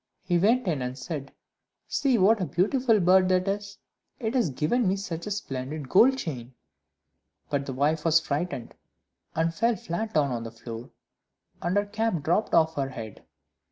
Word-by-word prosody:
He 175 -2 +1
went 230 +6 +3
in 155 -6 0
and 125 +1 -4
said, 140 +1 -6 0.6
"See 270 -4 +2
what 210 +2 +4
a - - +1
beautiful 225 +6 +2
bird 185 +1 +5
that 185 +1 +2
is 200 0 -3 0.4
it 225 -2 -2
has 245 - +2
given 160 - +1
me 190 - +2
such 180 -3 -5
a - - -2
splendid 140 -7 -4
gold 260 - +5
chain!" 130 - -6 1.0
But 140 -1 -1
the 135 - -3
wife 150 +4 +1
was 165 -1 +5
frightened, 150 -4 -3 0.6
and 165 +1 +1
fell 230 +7 +2
flat 205 +4 -4
down 145 -3 +3
on 120 -2 -2
the 115 - -6
floor, 115 +1 -9 0.7
and 175 +4 0
her 205 - +2
cap 210 -5 -1
dropped 175 +7 +1
off 160 -1 +4
her 135 -1 0
head. 115 -5 -8
170 Hz, 175 wpm, -27 LUFS, 140-205 Hz, 1.0 s, bird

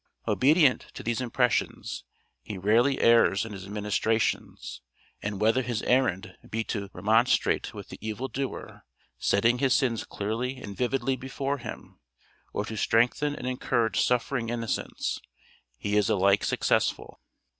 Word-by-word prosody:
Obedient 145 -1 +4
to - - -7
these 115 +1 -1
impressions, 125 0 -1 0.4
he 105 - -7
rarely 115 +8 +3
errs 115 -3 +4
in 110 - -7
his 95 0 -8
ministrations, 105 +2 -1 0.4
and 105 -1 -3
whether 110 +5 +3
his 120 -3 -3
errand 110 -6 +1
be 110 +1 -1
to 100 -3 -4
remonstrate 110 +6 +2
with - - -9
the - - -9
evil 110 +4 -3
doer, 135 0 -5 0.4
setting 115 +5 +2
his 130 -1 +3
sins 125 -7 +1
clearly 115 +6 -3
and 100 -5 -8
vividly 135 +2 0
before 135 +2 -3
him, 120 - -9 0.5
or 100 - -2
to 110 - -6
strengthen 120 +7 +2
and - - -7
encourage 120 -2 0
suffering 125 -1 0
innocence, 115 -1 -2 0.6
he 105 0 -2
is 105 - +3
alike 100 0 +3
successful. - - 0
115 Hz, 135 wpm, -27 LUFS, 105-130 Hz, 0.6 s, Obedient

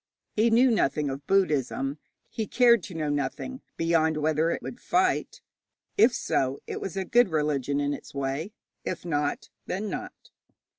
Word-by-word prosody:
He 220 +2 +3
knew 240 +3 +5
nothing 150 -9 +1
of 140 +1 -7
Buddhism; 145 -6 +1 0.3
he 220 -2 -4
cared 235 -3 +5
to 185 - -9
know 155 -2 -1
nothing, 145 - -3 0.2
beyond 160 -1 +2
whether 155 +1 +1
it - - -2
would 245 - -7
fight. 370 +1 0 0.5
If 405 -10 +6
so, 130 +1 0
it - - -5
was 195 0 -5
a 190 - -1
good 240 0 +4
religion 145 -3 0
in 145 0 0
its - - -8
way. 140 +7 -2 0.3
If 180 - -4
not, 145 -3 -1 0.2
then 200 +3 -3
not. - - -7
160 Hz, 160 wpm, -27 LUFS, 145-215 Hz, 0.5 s, If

